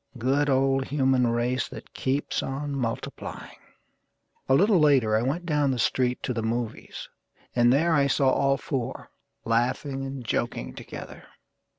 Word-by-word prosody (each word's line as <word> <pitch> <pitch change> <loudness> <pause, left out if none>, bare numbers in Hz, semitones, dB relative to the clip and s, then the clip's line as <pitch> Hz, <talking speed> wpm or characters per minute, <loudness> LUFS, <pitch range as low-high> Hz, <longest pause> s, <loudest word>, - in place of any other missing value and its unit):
Good 135 +5 +1
old 135 0 +2
human 130 -3 +2
race 120 +1 0
that - - -11
keeps 135 +2 -1
on 140 +1 -4
multiplying! 115 -4 -5 0.9
A 130 - +6
little 200 +4 +4
later 135 -8 +4
I 110 - +2
went 145 +8 -2
down 150 -4 +1
the 130 - 0
street 125 +1 0
to 125 - -1
the 115 - -2
movies, 115 0 -4 0.5
And 120 0 +5
there 160 +5 +3
I 140 -3 +3
saw 135 -1 +3
all 135 +1 +2
four, 130 -5 -4 0.3
laughing 130 +4 0
and 135 -2 -6
joking 65 - -2
together. - - -9
135 Hz, 150 wpm, -26 LUFS, 120-140 Hz, 0.9 s, A